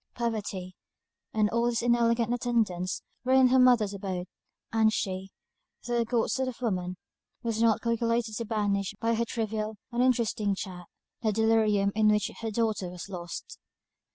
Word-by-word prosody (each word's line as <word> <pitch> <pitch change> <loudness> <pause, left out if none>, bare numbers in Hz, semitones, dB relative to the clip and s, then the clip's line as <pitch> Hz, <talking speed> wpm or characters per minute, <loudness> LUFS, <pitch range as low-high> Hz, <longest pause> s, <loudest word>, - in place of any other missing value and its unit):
Poverty, 205 -6 -3 0.6
and 215 -1 +2
all 235 +1 +2
its 235 -1 0
inelegant 235 -1 +2
attendants, 225 -7 0 0.2
were 255 +1 +2
in 260 -1 +6
her 260 +1 +5
mother's 240 -5 +5
abode; 190 -2 -4 0.5
and 220 -1 +4
she, 190 -2 -2 0.6
though 240 -1 0
a - - 0
good 230 -1 0
sort 265 -1 0
of 255 - -5
a 250 - -3
woman, 180 -4 -2 0.5
was 230 -1 -1
not 225 -2 +3
calculated 230 -1 0
to 230 - -3
banish, 205 -2 -1
by 230 0 +1
her 230 +1 +1
trivial, 220 -2 -3
uninteresting 235 -4 +1
chat, 180 -3 -7 0.3
the 220 - +2
delirium 215 -2 +3
in 215 0 +3
which 210 -1 +2
her 225 - -2
daughter 215 -4 -1
was 180 +2 -8
lost. 175 -3 -7
220 Hz, 160 wpm, -28 LUFS, 200-235 Hz, 0.6 s, in